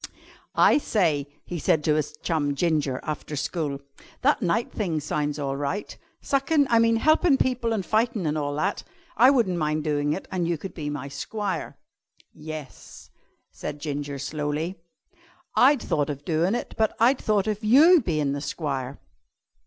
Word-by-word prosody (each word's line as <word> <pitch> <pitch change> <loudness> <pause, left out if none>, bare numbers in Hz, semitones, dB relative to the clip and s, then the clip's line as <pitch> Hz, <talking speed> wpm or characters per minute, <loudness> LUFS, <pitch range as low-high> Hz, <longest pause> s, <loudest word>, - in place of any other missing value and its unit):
"I - - +5
say," 160 - +1 0.2
he 175 - -5
said 150 +1 +2
to 155 - +3
his 150 0 -2
chum 145 -4 0
Ginger 150 -4 0
after 150 0 -5
school, 145 -1 -2 0.4
"that 290 0 +3
knight 215 +5 0
thing 175 -8 -2
sounds 150 0 -2
all 140 -2 -2
right. 145 +9 -3 0.3
Suckin' 280 +2 +2
I 230 - +5
mean 230 0 +4
helpin' 310 +4 +4
people 250 -3 0
an' 215 -4 -1
fightin' 220 -2 0
an' 150 0 0
all 145 -1 -2
that. 155 - -1 0.3
I 245 +4 +7
wun't 230 -10 +2
mind 155 0 0
doin' 145 -1 0
it 190 - -6
an' 180 -3 -1
you 170 -1 0
could 190 +6 -8
be 150 -3 -5
my 145 -2 -5
squire." 185 +5 -4 0.6
"Yes," 155 -3 -10 0.4
said 145 - -6
Ginger 145 -1 -4
slowly, 150 +5 -3 0.8
"I'd 270 0 +5
thought 145 -1 0
of 145 0 -6
doin' 170 +5 +1
it, - - -4
but 220 -1 +2
I'd 250 +4 +4
thought 210 -3 +1
of 215 0 -2
you 300 +10 +7
bein' 155 -7 0
the 140 0 -3
squire." 140 -4 -4
160 Hz, 165 wpm, -25 LUFS, 145-220 Hz, 0.8 s, I